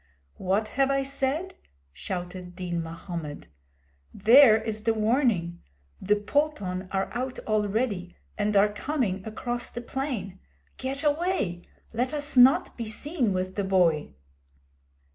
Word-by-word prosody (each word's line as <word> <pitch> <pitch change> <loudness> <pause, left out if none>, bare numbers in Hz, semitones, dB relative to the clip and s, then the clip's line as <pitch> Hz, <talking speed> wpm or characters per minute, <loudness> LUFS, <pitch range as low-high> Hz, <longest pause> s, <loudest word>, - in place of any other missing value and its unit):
'What 200 +4 0
have 270 0 +1
I 275 0 +1
said?' 275 +7 -2 0.4
shouted 180 - -6
Din 175 -2 -3
Mahommed. 165 -2 -6 0.7
'There 225 +2 +7
is 220 -1 -3
the 225 +1 +1
warning! 215 -7 +1 0.4
The 205 +2 +3
pulton 205 -6 -1
are 190 0 -1
out 255 +2 -3
already 210 -3 -1 0.2
and 210 0 +1
are 205 +1 +4
coming 210 -6 -2
across 240 +2 -3
the 240 - -6
plain! 235 -8 -4 0.4
Get 270 +2 -4
away! 295 - 0 0.3
Let 250 +6 -1
us 290 0 0
not 255 +2 +6
be 230 -2 -5
seen 255 - 0
with 185 0 -2
the 200 - -2
boy!' 170 - +2
215 Hz, 125 wpm, -27 LUFS, 185-265 Hz, 0.7 s, There